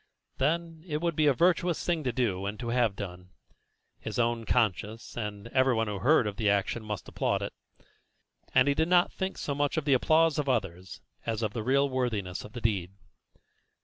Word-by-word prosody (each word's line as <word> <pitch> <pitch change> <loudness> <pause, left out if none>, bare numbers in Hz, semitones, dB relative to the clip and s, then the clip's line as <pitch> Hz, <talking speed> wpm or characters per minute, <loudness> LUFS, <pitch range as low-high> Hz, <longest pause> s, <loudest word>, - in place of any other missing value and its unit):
Then, 165 +3 -1
it 150 -2 -2
would 170 -1 -1
be 155 0 +3
such 145 - +5
a - - -21
virtuous 175 0 +2
thing 170 -3 0
to 125 - +1
do 100 -6 -1
and 105 +1 -5
to 120 - -4
have 120 -4 +2
done; 90 -2 -7 0.7
his - - -5
own 115 -2 0
conscience 110 -1 0
and 105 -3 -5
everyone 130 -3 +2
who 105 -2 -4
heard 135 0 +4
of 105 -1 -4
the 110 -3 +2
action 100 +3 0
must 105 -2 -5
applaud - - -1
it. - - -5 1.0
And 130 +1 +4
he 140 - +4
did 160 +3 +1
not 175 0 +4
think 190 0 -3
so 145 - -2
much 145 +2 0
of 155 - -1
the 140 - +4
applause 155 +4 +3
of 145 -2 -1
others 95 -6 -2 0.3
as 115 0 -1
of 105 -1 -1
the 115 - -3
real 135 +5 +2
worthiness 115 -9 -2
of 105 - -11
the 120 - -6
deed. 95 -5 -1
120 Hz, 205 wpm, -29 LUFS, 105-150 Hz, 1.0 s, such